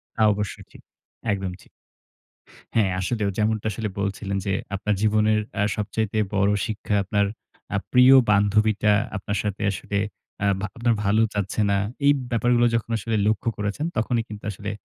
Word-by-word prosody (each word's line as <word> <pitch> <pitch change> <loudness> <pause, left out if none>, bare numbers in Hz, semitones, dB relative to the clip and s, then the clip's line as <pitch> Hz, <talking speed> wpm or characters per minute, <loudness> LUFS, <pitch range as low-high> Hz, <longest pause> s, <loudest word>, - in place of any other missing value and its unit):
তা 110 - -2
অবশ্যই 105 -1 -5
ঠিক। - - -15 0.5
একদম 95 -2 -3
ঠিক। - - -20 1.1
হ্যাঁ, 105 -4 +3
আসলেও 105 +1 -1
যেমনটা 110 0 0
আসলে 110 0 -3
বলছিলেন 100 0 -2
যে, 100 - +1 0.2
আপনার 105 +1 0
জীবনের 110 0 +3 0.2
আ - - +3
সবচাইতে 110 +1 -2 0.2
বড় 100 +1 +3 0.2
শিক্ষা, 110 -1 -3
আপনার 100 0 +1 0.5
আ - - +3 0.2
প্রিয় 125 +1 +7 0.2
বান্ধবীটা 105 +1 +3 0.2
আপনার 100 +1 -3
সাথে 105 -1 -3
আসলে, 100 +2 -3 0.5
আ - - +3
ভা 105 - -1
আপনার 120 0 +2
ভালো 105 +3 +3
চাচ্ছে 100 +1 -2
না। 100 - +3 0.3
এই 145 - +7 0.2
ব্যাপারগুলো 120 +1 +3
যখন 115 0 -1
আসলে 110 +1 -2
লক্ষ্য 110 +2 +1
করেছেন, 105 +9 -2
তখনই 115 +1 +1
কিন্তু 105 -1 -9
আসলে 100 +1 -6
105 Hz, 160 wpm, -24 LUFS, 100-110 Hz, 1.1 s, প্রিয়